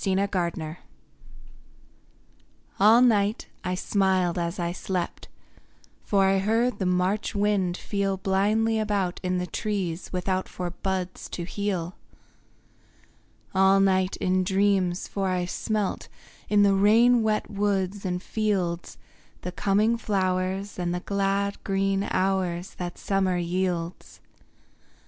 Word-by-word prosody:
INTIMATION 180 -5 -1 2.0
All 220 +5 +7
night 210 -3 +2
I 180 0 -1
smiled 185 -2 +1
as 170 +3 -2
I 170 -2 -1
slept, 180 0 -4 0.8
For 195 -2 +2
I 195 0 +3
heard 225 +5 +1
the 190 - 0
March 185 +4 0
wind 200 -3 +1
feel 200 -1 -1
Blindly 210 +4 +1
about 200 -4 -1
in 185 0 -1
the 180 - -1
trees 185 -2 -3
without 185 +1 -1
For 180 -1 -4
buds 185 0 -4
to 175 - -5
heal. 185 -2 -3 1.6
All 195 +1 +5
night 190 -1 +2
in 185 0 +1
dreams, 190 -1 +1
for 195 -1 -2
I 180 -1 0
smelt, 210 +2 -2 0.4
In 205 -1 +5
the 200 -1 +5
rain 225 +5 +5
wet 215 0 0
woods 200 -1 -1
and 180 -1 -2
fields, 190 -6 -2 0.4
The 180 - -4
coming 205 +6 +2
flowers 190 -1 -1
and 175 0 -1
the 180 - -3
glad 200 +1 -1
green 195 0 0
hours 185 -1 -1
That 175 -1 -4
summer 190 -2 0
yields. 175 0 -3
190 Hz, 120 wpm, -26 LUFS, 180-205 Hz, 2.0 s, All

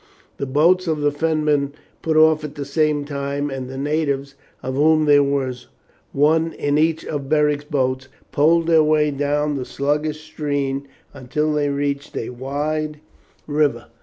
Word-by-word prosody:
The 140 - -3
boats 170 +7 +3
of 155 -2 0
the 145 0 +2
Fenmen 150 -2 0 0.3
put 160 -1 0
off 155 -1 +5
at 150 -1 -6
the 145 - -5
same 150 0 +1
time, 140 0 -3
and 130 -1 -5
the 135 - -7
natives, 140 -1 -1 0.3
of 130 +1 -3
whom 155 +3 +3
there 145 -1 +6
was 135 -3 -2 0.4
one 160 +3 +2
in 145 0 0
each 160 +1 +1
of 140 -3 -4
Beric's 150 -1 +2
boats, 130 -3 -1 0.2
poled 165 +3 +3
their 165 -1 +5
way 150 -1 +3
down 145 +1 0
the 130 - -3
sluggish 150 +3 -2
stream 145 -3 -3 0.3
until 145 +3 -2
they 145 -1 +1
reached 140 0 -2
a - - -3
wide 150 +4 -3 0.5
river. 145 -6 0
145 Hz, 160 wpm, -21 LUFS, 140-155 Hz, 0.5 s, there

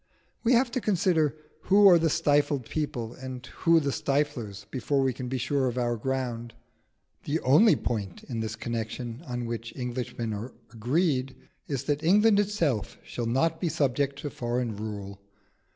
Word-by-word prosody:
We 240 +2 +4
have 240 0 +3
to 255 - -1
consider 170 -7 +2 0.3
who 200 +1 +7
are 175 -3 +8
the 165 0 +2
stifled 145 -3 +2
people 120 -7 -3
and 130 -1 -8
who 165 +6 +3
the 140 -3 -1
stiflers 130 -9 -2
before 135 +2 0
we 130 -1 +1
can 125 0 -6
be 130 +1 -2
sure 130 +2 0
of 125 0 -3
our 120 -1 +1
ground. 120 -1 -3 0.7
The 155 +3 0
only 175 - +6
point 100 -7 -3
in 115 -3 -5
this 110 0 -3
connection 115 +2 -4
on 120 -1 -3
which 115 0 -5
Englishmen 120 -3 -3
are 110 +5 -6 0.2
agreed 130 +3 0 0.3
is, 135 -4 -2
that 145 0 -1
England 205 +4 +5
itself 170 - 0
shall 120 -1 -4
not 160 +7 +1
be 175 - +1
subject 140 -1 0
to 145 - -3
foreign 120 -2 -2
rule. 100 -2 -6
130 Hz, 165 wpm, -27 LUFS, 120-155 Hz, 0.7 s, are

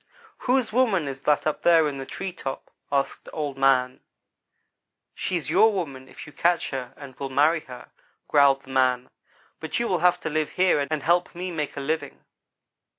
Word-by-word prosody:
"'Whose 250 -4 +2
woman 220 - +2
is 135 0 -6
that 150 0 +1
up 155 - -1
there 165 -2 +5
in 140 -2 -4
the 135 - -7
tree 190 -2 -5
top?' 135 -6 -6 0.2
asked 140 -1 -1
Old 145 -3 -3
man. 130 -2 +2 1.1
"'She's 175 -5 -3
your 220 - +5
woman 140 -10 -5
if - - -11
you 150 - -13
can - - -18
catch 175 0 +2
her 130 -3 -5
and 140 -2 -10
will 135 - -4
marry 150 +5 +3
her,' 125 -1 -11 0.4
growled 140 -2 +4
the 135 - -12
man; 130 -1 +1 0.5
'but 160 - -3
you 235 - 0
will 180 -5 0
have 180 +1 +3
to - - -3
live 155 0 -1
here 185 -4 +3
and 155 -3 -2
help 175 +3 +1
me 180 +1 -4
make 150 -4 -4
a - - -3
living.' 145 0 -4
150 Hz, 190 wpm, -25 LUFS, 135-175 Hz, 1.1 s, there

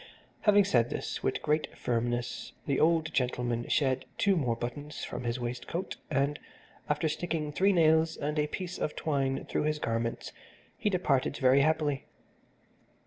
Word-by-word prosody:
Having 205 -1 +6
said 120 - +3
this - - -4
with - - -1
great 150 +1 0
firmness, 120 0 -2
the 140 -2 +1
old 160 0 +3
gentleman 120 -2 0
shed 130 -2 +1
two 200 -1 +3
more 125 -8 +1
buttons 145 +6 -5
from 125 - -5
his 120 +1 -1
waistcoat, 125 +9 -4
and, 140 +2 +1 0.5
after 150 +2 +1
sticking 155 -1 -2
three 195 +6 +3
nails 160 -2 +4
and 150 +1 -2
a 150 - +2
piece 180 +3 -5
of 150 - -2
twine 135 -3 -1
through - - -1
his 155 0 +1
garments, 115 -4 -2 0.4
he 210 - 0
departed 150 -8 +1
very 130 0 +5
happily. 150 -2 +1
145 Hz, 150 wpm, -30 LUFS, 125-160 Hz, 0.5 s, Having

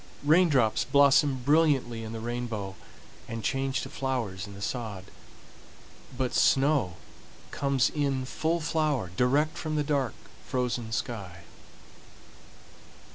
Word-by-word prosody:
Raindrops 145 -8 +4
blossom 140 -2 +4
brilliantly 140 -6 +2
in 110 - -6
the 115 - -5
rainbow, 115 -4 -4 0.5
and 115 -1 -5
change 135 +3 -1
to - - -6
flowers 115 -8 -3
in 100 - -10
the - - -10
sod, 105 -6 -4 1.1
but 130 -1 -1
snow 135 - +3 0.5
comes 140 -3 +1
in 140 -3 -1
full 160 +5 -1
flower 150 - 0
direct 140 +8 +2
from 155 -1 -3
the 150 - +1
dark, 140 -6 0 0.3
frozen 125 -3 -2
sky. 100 -6 -4
130 Hz, 115 wpm, -28 LUFS, 115-145 Hz, 1.1 s, Raindrops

